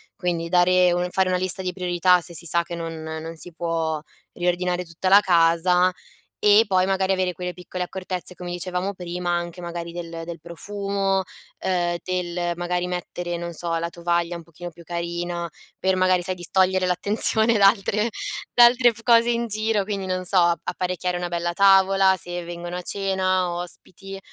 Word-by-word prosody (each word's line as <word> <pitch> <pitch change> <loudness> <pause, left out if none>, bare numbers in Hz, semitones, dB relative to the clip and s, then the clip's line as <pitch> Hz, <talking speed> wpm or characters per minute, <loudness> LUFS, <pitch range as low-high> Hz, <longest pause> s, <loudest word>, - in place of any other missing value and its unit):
Quindi 170 -2 -2
dare 180 +1 +4
un 175 +1 -1
fare 190 +1 +1
una 180 - +1
lista 185 +1 +1
di 180 -1 -2
priorità 180 0 +2
se 170 0 -7
si 170 - -4
sa 170 +1 +2
che 170 0 -7
non 165 -1 -6
non 160 +1 -6
si 175 +2 -7
può 165 -2 -2 0.3
riordinare 180 0 -1
tutta 165 +3 -3
la 200 +2 +9
casa 180 0 +3 0.5
e 210 +2 +7
poi 185 -2 +3
magari 190 0 +1
avere 185 -1 0
quelle 180 0 -5
piccole 180 +1 -5
accortezze, 185 0 -5
come 175 -1 -7
dicevamo 180 +2 -3
prima, 180 -1 -5
anche 175 0 -3
magari 170 -1 -6
del 170 -1 -6
del 170 0 -7
profumo, 195 +3 -2 0.4
ehm, 175 -2 0
del 175 -1 -2
magari 175 0 -1
mettere, 175 -1 -4
non 170 0 -5
so, 170 +1 -2
la 170 +1 -2
tovaglia 170 0 -1
un 170 - -8
pochino 170 +2 -9
più 170 0 -15
carina 170 0 -4 0.3
per 190 0 +1
magari 185 -1 +3
sai 185 +1 -3
distogliere 185 +1 +1
l'attenzione 215 +5 +2
da 200 -1 +7
altre 210 +2 +1 0.4
da 240 - +8
altre 240 0 +5
cose 235 0 +5
f - - +2
in 235 0 -1
giro. 215 -1 0
Quindi 200 -2 -3
non 185 0 -2
so, 185 - +3
ap 170 -1 +4
apparecchiare 180 0 -2
una 175 0 -3
bella 175 0 -2
tavola, 195 0 +5
se 175 0 -5
vengono 175 +1 -6
a 180 - -4
cena, 185 -1 0
ospiti, 185 +2 -8
180 Hz, 180 wpm, -23 LUFS, 175-190 Hz, 0.5 s, la